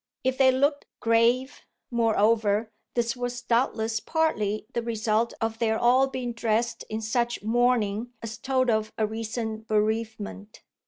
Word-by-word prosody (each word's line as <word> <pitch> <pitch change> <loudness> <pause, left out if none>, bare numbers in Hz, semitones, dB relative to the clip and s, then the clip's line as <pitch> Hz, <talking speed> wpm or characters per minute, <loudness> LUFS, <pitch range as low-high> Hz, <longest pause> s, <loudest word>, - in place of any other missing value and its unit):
If 260 +1 0
they 260 -1 +6
looked 285 +3 +1
grave, 235 +3 +2 0.3
moreover, 220 -2 +2 0.2
this 235 0 0
was 245 0 -4
doubtless 230 -2 +1
partly 215 -10 0
the 235 - 0
result 225 0 0
of 225 0 -2
their 220 -1 +1
all 255 +3 +4
being 255 -2 -4
dressed 230 0 -1
in 220 +1 -3
such 235 +1 -1
mourning 235 -1 +1
as 220 -1 -6
told 260 -2 +1
of 215 -1 0
a 220 - +2
recent 220 0 -4
bereavement. 215 -1 -2
230 Hz, 140 wpm, -26 LUFS, 220-245 Hz, 0.3 s, they